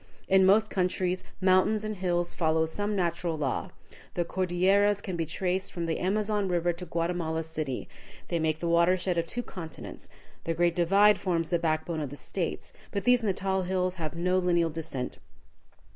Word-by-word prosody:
In 190 0 +5
most 215 +3 +4
countries 185 0 0 0.2
mountains 190 +3 +3
and 215 -1 -4
hills 175 -2 0
follow 160 -1 +2
some 205 +6 -2
natural 170 -2 -1
law. 140 -4 -2 0.5
The 175 - 0
Cordilleras 190 +3 +2
can 190 -3 -5
be 165 -2 -2
traced 185 +3 -1
from 170 -1 -3
the 165 -1 -1
Amazon 205 +1 0
River 175 -1 +1
to 175 +1 -7
Guatemala 165 -1 -1
City; 155 -5 -4 0.4
they 170 - -1
make 155 -1 +1
the 170 - -3
water 170 +2 +4
shed 180 -1 0
of 165 - -2
two 245 +8 -3
continents; 165 -7 -8 0.3
the 165 - -2
Great 175 0 +2
Divide 200 +4 +5
forms 170 -3 -1
the 170 - +2
backbone 160 0 -1
of 145 - -3
the 145 - -8
States, 170 +6 -4 0.2
but 200 - -3
these 245 0 +4
Natal 190 -2 0
hills 185 0 0
have 155 0 -3
no 180 +2 +1
lineal 170 -2 +2
descent. 150 -5 -5
175 Hz, 175 wpm, -28 LUFS, 165-190 Hz, 0.5 s, In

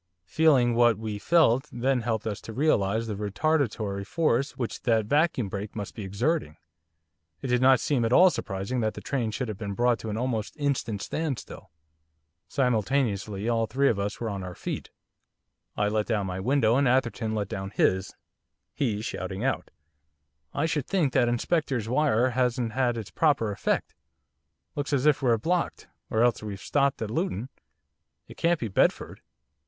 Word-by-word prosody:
Feeling 130 - +3
what 120 -2 +4
we 110 -2 -4
felt 150 -2 +3
then 125 +1 0
helped 110 -2 -2
us 105 -3 -3
to 110 - -8
realise 115 -5 +1
the 110 - -3
retardatory 105 -2 -1
force 140 +1 0
which 120 -3 -4
that 115 -3 +2
vacuum 145 -2 +2
brake 100 +2 -6
must 105 -2 -5
be 110 - -7
exerting, 100 - -1 0.9
it 130 - -3
did 125 0 +2
not 130 -1 +6
seem 135 -5 0
at 115 - 0
all 180 +7 +7
surprising 100 +3 -3
that 110 -2 -1
the - - -7
train 125 -5 -1
should 125 +3 -3
have 105 -2 -6
been 100 -2 -4
brought 120 0 +2
to 110 - -6
an 105 - -3
almost 115 0 -2
instant 135 -8 -1
standstill. 155 -5 -4 0.8
Simultaneously 110 -5 0
all 115 -1 +1
three 140 +3 +2
of 105 - 0
us 100 +2 -3
were 115 - -3
on 100 -1 -4
our 90 -1 -7
feet. - - -5 0.9
I 105 - +2
let 105 0 0
down 105 -4 0
my 95 0 -4
window 120 +1 +2
and 140 -1 +3
Atherton 120 -3 +1
let 105 -2 -1
down 95 -2 -5
his, 95 -1 +1 0.6
he 110 -6 -1
shouting 95 -2 -4
out, 135 - -1 0.9
'I 145 - +1
should 155 -4 -1
think 165 -10 +1
that 120 - +3
Inspector's 125 -1 0
wire 130 -1 +2
hasn't 125 -1 0
had 120 0 0
it's 110 -3 -6
proper 140 -9 +2
effect, 100 - -1 0.8
looks 145 0 -3
as 140 0 +1
if 150 -2 +4
we're 120 -4 +3
blocked 170 +10 -1 0.2
or 110 +1 +2
else 120 -1 +2
we've 105 -2 -6
stopped 140 +1 0
at 110 - -4
Luton. 130 - -2 0.8
It - - -12
can't 170 -1 +1
be 115 - -2
Bedford. 95 - 0
120 Hz, 175 wpm, -27 LUFS, 105-135 Hz, 0.9 s, all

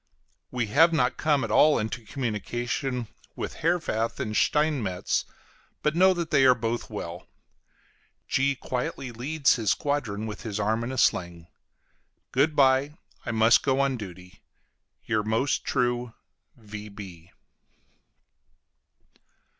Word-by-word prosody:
We 125 -2 -1
have 160 +11 +5
not 125 -6 +1
come 150 -3 +2
at 110 - -3
all 150 +7 +5
into 110 +2 -3
communication 120 +1 -3 0.3
with - - -5
Herwarth 135 -10 0
and 105 0 -3
Steinmetz, 135 -14 +1 0.6
but 150 +1 +1
know 190 +2 +6
that 170 -2 -3
they 140 -2 +4
are 125 - +6
both 115 0 -3
well. - - -7 1.0
G 135 +1 +1
quietly 125 0 -4
leads 140 +5 +1
his 110 -3 -1
squadron 110 -6 -1
with 110 0 -6
his 110 -3 -4
arm 110 +3 0
in 120 - -4
a 130 - -5
sling. 85 -6 0 0.8
Good 145 +4 +2
bye, 135 +1 +3 0.3
I - - 0
must 115 +1 +5
go 135 -1 +1
on 140 -1 +2
duty. 90 -5 -10 0.6
YOUR 110 -2 +1
MOST 110 +6 0
TRUE 120 -2 -1 0.4
V. 105 -6 -10
120 Hz, 125 wpm, -26 LUFS, 110-140 Hz, 1.0 s, know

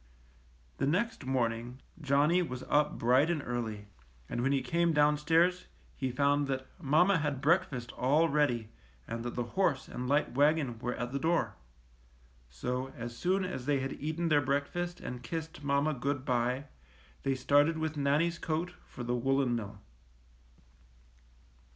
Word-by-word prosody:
The 135 - +1
next 205 - -1
morning 120 -1 -1 0.2
Johnny 145 +5 +3
was 130 -7 -4
up 150 0 +2
bright 130 +6 +3
and 160 -5 -1
early, 110 -4 -3 0.4
and 120 - -3
when 135 +3 +1
he 135 -1 +1
came 170 0 +1
downstairs 155 +4 +3 0.3
he 130 - -2
found 140 +2 +2
that 130 -1 -2 0.2
mamma 165 +6 +4
had 145 -3 -1
breakfast 135 -5 +1
all 150 +6 +2
ready 130 -7 +1 0.4
and 115 0 -4
that 120 - -4
the 120 - -1
horse 140 +1 0
and 125 0 -5
light 145 +2 +2
wagon 145 -3 +2
were 125 +1 -2
at 120 0 -4
the 140 - -2
door. 165 +2 +1 1.0
So, 125 - -3
as 120 0 -6
soon 185 +7 +1
as 130 -8 -5
they 145 -2 +2
had 135 +1 -3
eaten 160 +3 -2
their 145 -2 +4
breakfast 145 +6 -2
and 125 -1 -6
kissed 160 +4 -6
mamma 140 +2 +1
good 135 +1 -2
by, 125 +2 0 0.6
they 135 -1 0
started 145 +5 +3
with 160 -1 -2
Nannie's 150 +4 +1
coat 165 +3 -2
for 120 - -8
the 120 +1 -1
woolen 135 0 +1
mill. 105 -3 -6
140 Hz, 155 wpm, -31 LUFS, 125-160 Hz, 1.0 s, mamma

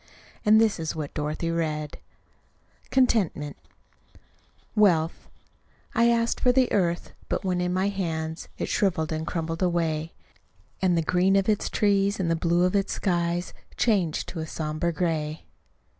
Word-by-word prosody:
And 215 0 +6
this 220 -5 +2
is 160 0 -3
what 150 -3 -5
Dorothy 155 +2 -2
read: 155 -3 -2 0.9
CONTENTMENT 200 - +1 1.2
Wealth 175 -6 +2 0.6
I 235 +1 +4
asked 230 0 +1
for 250 - +4
the 255 -1 +2
earth 175 -3 0 0.2
but - - -2
when 180 -1 0
in 180 0 0
my 190 +2 +1
hands 160 -4 -3
It - - -2
shriveled 170 -6 0
and 160 0 -3
crumbled 165 -1 -3
away; 165 -3 0 0.7
And 180 -3 +3
the 165 - +1
green 180 +4 +3
of 195 -1 +2
its 215 -1 +1
trees 200 -1 +2
and 170 -3 0
the - - +3
blue 170 +1 +2
of 180 +2 +2
its 195 -1 +1
skies 175 -1 -1 0.2
Changed 190 -9 +1
to 170 - -6
a 160 - -4
somber 155 +2 -2
gray. 160 -2 -2
175 Hz, 150 wpm, -26 LUFS, 160-195 Hz, 1.2 s, And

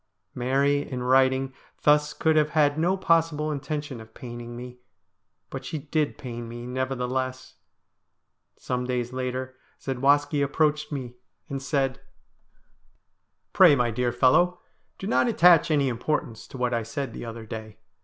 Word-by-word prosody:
Mary 135 +3 +1
in 130 -3 -5
writing 130 +1 +3 0.3
thus 150 0 +4
could 160 -1 +1
have 155 -1 +3
had 145 -1 +4
no 175 +5 +1
possible 165 -4 +1
intention 145 -3 -4
of 110 0 -15
paining 120 -1 -8
me, 125 0 -9 0.7
but 135 0 -6
she 155 +4 -4
did 150 +1 -1
pain 120 -4 -7
me, 120 +1 -7
nevertheless. 130 0 -3 1.0
Some 125 0 -3
days 125 -1 -2
later 130 0 -4 0.2
Zadwaski 145 +3 +2
approached 150 +2 +1
me 125 -4 -5 0.3
and 135 -1 -4
said: 135 -2 -1 0.8
' - - -44
Pray, 175 -6 +7
my 120 -3 +1
dear 120 +2 0
fellow, 175 +9 +3 0.4
do - - -7
not 225 - +2
attach 170 -6 +5
any 145 -3 +2
importance 120 -2 -2
to - - -10
what 125 -1 0
I 115 - +1
said 115 +2 -5
the - - -7
other 115 -1 -7
day. 110 -1 -8
130 Hz, 145 wpm, -26 LUFS, 125-150 Hz, 1.0 s, Pray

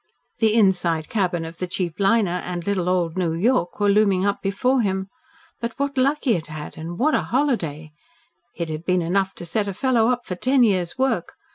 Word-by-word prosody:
The 220 -1 +3
inside 180 -7 +2
cabin 180 -6 0
of 165 +1 -9
the 180 - -2
cheap 175 -1 -3
Liner 195 -3 +2
and 175 -1 -5
"little 185 -3 0
old 180 -2 0
New 170 -3 0
York" 175 0 0
were 205 - +2
looming 200 -2 +3
up 200 0 0
before 250 +7 +1
him. 190 -2 -1 0.5
But 235 0 -4
what 280 +1 -2
luck 275 +3 +2
he 250 - +3
had 165 -5 -3
had, 155 -1 -8
and 165 +2 -7
what 300 +5 +2
a - - +3
holiday! 170 - -1 0.6
It 170 -2 -4
had 155 +1 -5
been 180 -1 +1
enough 190 +3 0
to 175 - -8
set 205 +5 -1
a 195 - -4
fellow 245 -3 +2
up 245 0 0
for - - -4
ten 255 +7 +2
years' 185 -5 +1
work. 255 -9 0
190 Hz, 210 wpm, -22 LUFS, 175-230 Hz, 0.6 s, The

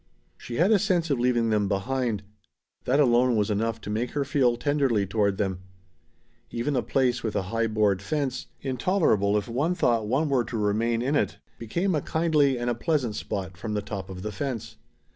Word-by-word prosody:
She 120 - -8
had 180 - +3
a 215 - +5
sense 170 -4 +1
of 135 - +1
leaving 120 -2 +2
them 105 -2 +2
behind. 110 +2 -1 0.6
That 135 +3 +2
alone 125 -2 +4
was 105 -1 +1
enough 115 +2 -1
to 105 - -6
make 115 +3 -2
her 145 -1 0
feel 130 -4 +2
tenderly 135 -7 +1
toward 100 0 0
them. 95 -3 -1 0.9
Even 135 +5 -2
a 125 - +2
place 125 +1 +1
within 110 -2 -1
a - - -3
high 115 +4 -1
board 105 -3 +1
fence, 130 +3 -2
intolerable 130 - +2
if 105 - -2
one 145 +9 0
thought 115 -9 +1
one 135 +8 +1
were 135 -4 +2
to 115 +1 -4
remain 115 +3 +1
in 140 +4 0
it, - - 0 0.2
became 175 - -1
a 150 - +1
kindly 155 -5 +2
and 120 0 -3
a 120 - +2
pleasant 125 -3 -1
spot 95 -2 -4
from 105 +4 -4
the 105 - 0
top 100 -2 -6
of 90 -1 -7
the 105 - -3
fence. 115 0 -4
120 Hz, 200 wpm, -26 LUFS, 105-140 Hz, 0.9 s, a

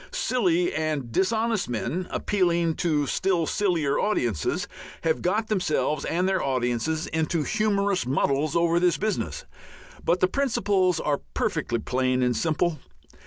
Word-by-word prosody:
Silly 195 - +1
and 155 -6 -2
dishonest 220 - 0
men, 135 - -2
appealing 170 -4 +1
to 150 -4 +1
still 180 +2 0
sillier 170 -7 0
audiences, 120 - 0 0.4
have 160 -1 +1
got 210 +5 0
themselves 155 -7 0
and 180 +3 0
their 190 -1 +1
audiences 130 +4 -1
into 160 0 -1
humorous 200 -1 +1
muddles 140 +2 +1
over 170 0 +3
this 175 -1 +2
business, 215 - -2 0.6
but 175 - +2
the 185 - +4
principles 200 - +1
are 145 -1 -1
perfectly 120 - -1
plain 130 +2 0
and 125 -1 +1
simple. 160 -1 0
170 Hz, 130 wpm, -25 LUFS, 145-195 Hz, 0.6 s, the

